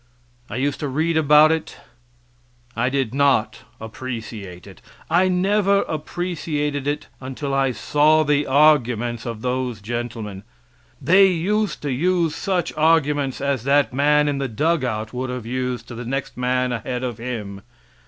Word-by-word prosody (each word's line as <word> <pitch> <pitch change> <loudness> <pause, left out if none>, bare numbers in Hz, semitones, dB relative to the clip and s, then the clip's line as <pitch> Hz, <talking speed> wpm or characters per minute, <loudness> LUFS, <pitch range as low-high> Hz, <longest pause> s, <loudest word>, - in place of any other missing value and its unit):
I - - -6
used 140 +3 -1
to 145 - -2
read 160 +5 0
about 150 0 +6
it 160 -1 -3 1.0
I 125 +2 +1
did 135 -4 -1
not 140 -5 +2 0.2
appreciate 110 -6 -7
it. - - -14 0.3
I 180 +3 +4
never 200 +2 +2
appreciated 150 -3 -3
it 145 +1 -2
until 135 +2 -5
I 135 -1 +2
saw 150 +5 +3
the 145 -1 +1
arguments 125 -5 +2
of 115 -2 -6
those 125 -2 -2
gentlemen. 110 -2 -5 0.6
They 185 +8 +5
used 195 +4 -1
to 145 - -2
use 170 +4 +1
just - - -8
such 185 -4 -1
arguments 150 -4 +1
as 140 -4 -1
that 140 -1 +3
man 150 +2 +3
in 140 -1 -1
the 135 - -1
dug 150 +6 0
out 110 -2 -3
would 130 +1 -3
have 125 -2 -5
used 125 +1 -3
to - - -7
the 120 +1 -6
next 135 +3 -4
man 125 0 0
ahead 125 +2 -3
of 120 -4 -4
him. 105 -5 -5
135 Hz, 155 wpm, -22 LUFS, 120-155 Hz, 1.0 s, about